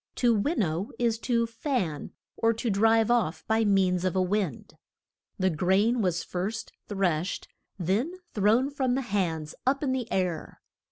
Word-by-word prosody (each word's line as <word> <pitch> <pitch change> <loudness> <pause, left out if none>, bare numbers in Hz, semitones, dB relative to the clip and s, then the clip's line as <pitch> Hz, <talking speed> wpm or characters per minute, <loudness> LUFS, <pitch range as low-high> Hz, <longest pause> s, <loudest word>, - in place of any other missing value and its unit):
To 240 -2 +3
win 255 +10 0
now 180 -2 0
is 230 -2 +1
to 235 -1 +1
fan, 230 - -2 0.2
or 230 0 +2
to 230 0 -2
drive 225 +3 +4
off 225 -9 +1
by 220 0 +2
means 190 -3 +2
of 185 0 0
a 185 - +3
wind. 185 - -2 0.6
The 190 0 +2
grain 195 +9 +2
was 180 -3 0
first 200 +5 -4 0.2
threshed, 185 -4 -1 0.3
then 205 - 0 0.2
thrown 225 +7 +3
from 260 -3 0
the 270 - -1
hands 170 -8 -2
up 275 +2 +2
in 270 - +1
the 255 -3 -2
air. 180 -3 -2
210 Hz, 160 wpm, -27 LUFS, 185-235 Hz, 0.6 s, drive